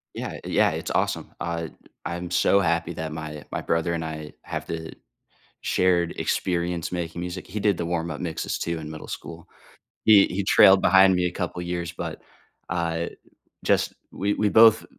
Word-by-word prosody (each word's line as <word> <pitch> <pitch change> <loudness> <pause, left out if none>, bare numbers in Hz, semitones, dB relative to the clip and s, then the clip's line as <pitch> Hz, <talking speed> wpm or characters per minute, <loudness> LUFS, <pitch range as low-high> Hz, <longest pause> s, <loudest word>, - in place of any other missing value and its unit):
Yeah, - - -5
yeah, - - +3
it's - - -4
awesome. - - -1
Uh, 85 -1 -3 0.4
I'm 85 +1 -4
so 100 - +4
happy 85 -2 0
that 80 0 -5
my 75 -1 -6
my - - -3
brother 85 +1 0
and 80 -1 -2
I 80 -1 -6
have - - -5
the 80 -1 -5 0.7
shared 90 -2 +2
experience 85 -2 -1
making 85 -1 -4
music. 90 +1 -5
He 105 +3 -4
did 105 0 +2
the 85 - -2
warm 85 -1 -2
up 75 - -6
mixes 85 -3 -3
too 85 -1 -2
in 75 -1 -7
middle 75 - -9
school. 85 0 -8 0.6
He 105 -3 +7
he 100 +1 -2
trailed 95 0 +7
behind 95 0 +6
me 90 0 +1
a 90 - 0
couple 90 -1 -4
years, 85 -1 -3
but, - - -6 0.5
uh, 85 -1 -1 0.6
just - - +2 0.2
we 100 +2 -1
we 105 - +1
both 115 0 +7
85 Hz, 175 wpm, -25 LUFS, 80-90 Hz, 0.7 s, He